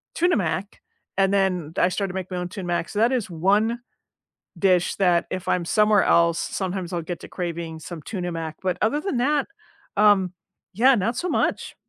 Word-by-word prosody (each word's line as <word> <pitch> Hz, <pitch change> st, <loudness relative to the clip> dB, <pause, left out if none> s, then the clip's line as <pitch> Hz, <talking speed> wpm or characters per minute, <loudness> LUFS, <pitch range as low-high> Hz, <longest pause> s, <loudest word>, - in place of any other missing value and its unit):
Tuna 350 Hz, +1 st, +2 dB
Mac, 190 Hz, +1 st, -3 dB, 0.4 s
and 195 Hz, 0 st, +3 dB
then 180 Hz, -5 st, 0 dB
I 180 Hz, -, +4 dB
started 195 Hz, -1 st, -2 dB
to -, -, -9 dB
make 185 Hz, -1 st, -4 dB
my 180 Hz, -, -3 dB
own 180 Hz, 0 st, -3 dB
Tuna 190 Hz, -2 st, -6 dB
Mac, 175 Hz, -1 st, -1 dB
so 205 Hz, -, -3 dB
that 230 Hz, +3 st, +4 dB
is 245 Hz, -5 st, -1 dB
one 205 Hz, +8 st, +1 dB, 0.8 s
dish 185 Hz, -3 st, +2 dB
that 180 Hz, -3 st, +2 dB
if 185 Hz, -1 st, -4 dB
I'm 175 Hz, -1 st, +1 dB
somewhere 210 Hz, +1 st, +4 dB
else, 170 Hz, 0 st, +3 dB
sometimes 185 Hz, -2 st, -3 dB
I'll 170 Hz, -, -2 dB
get 170 Hz, +1 st, -6 dB
to -, -, -10 dB
craving 170 Hz, -2 st, -5 dB
some 165 Hz, +1 st, -8 dB
Tuna 180 Hz, 0 st, -4 dB
Mac, 160 Hz, -2 st, -5 dB
but 185 Hz, -2 st, -1 dB
other 270 Hz, +8 st, +2 dB
than 380 Hz, -11 st, -1 dB
that, 285 Hz, +3 st, +1 dB, 0.5 s
um, 205 Hz, -3 st, +4 dB, 0.4 s
yeah, 255 Hz, +6 st, +5 dB
not 220 Hz, +4 st, 0 dB
so 360 Hz, -, -2 dB
much. -, -, -1 dB
185 Hz, 195 wpm, -24 LUFS, 175-210 Hz, 0.8 s, yeah